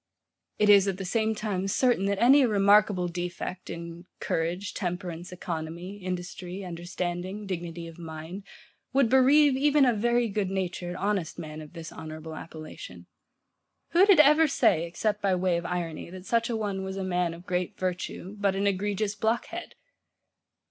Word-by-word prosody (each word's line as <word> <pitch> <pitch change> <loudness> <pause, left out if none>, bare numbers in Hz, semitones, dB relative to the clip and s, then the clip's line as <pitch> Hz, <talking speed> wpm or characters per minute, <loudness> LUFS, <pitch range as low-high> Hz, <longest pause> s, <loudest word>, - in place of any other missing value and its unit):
It 210 - +3
is, 200 -1 +7
at 195 -2 -1
the 190 - -5
same 220 +3 0
time, 200 -3 -2
certain, 210 -1 +2
that 200 0 0
any 270 +4 +7
remarkable 205 -4 +4
defect 175 +1 -5
in 170 +1 -7
courage, 175 +5 -2
temperance, 180 -1 -4
economy, 175 +2 -5
industry, 180 0 -5
understanding, 175 +3 -4
dignity 170 -3 -5
of 165 0 -11
mind, 165 +3 -7 0.5
would 270 -3 +4
bereave 270 +2 +6
even 290 +1 +4
a 245 - +4
very 240 +2 +2
good 200 -2 -1
natured, 180 -2 -3
honest 195 -4 -1
man 155 -2 -7
of 155 +1 -12
this 165 -2 -8
honourable 155 0 -8
appellation. 155 - -9 0.8
Who 365 +4 +5
did 395 -6 +6
ever 300 +2 +7
say, 170 - +2
except 210 +4 -1
by 195 -2 +2
way 180 -1 +1
of 170 - -4
irony, 170 -3 -4
that 185 +1 -10
such 230 +2 +1
a 235 - -1
one 200 -3 -2
was 190 0 -5
a 195 - -2
man 180 -2 0
of 170 +2 -14
great 180 +2 -2
virtue, 185 +1 -4
but 200 -1 +1
an 195 +1 0
egregious 200 +1 0
blockhead? 220 +2 -2
185 Hz, 160 wpm, -27 LUFS, 175-210 Hz, 0.8 s, is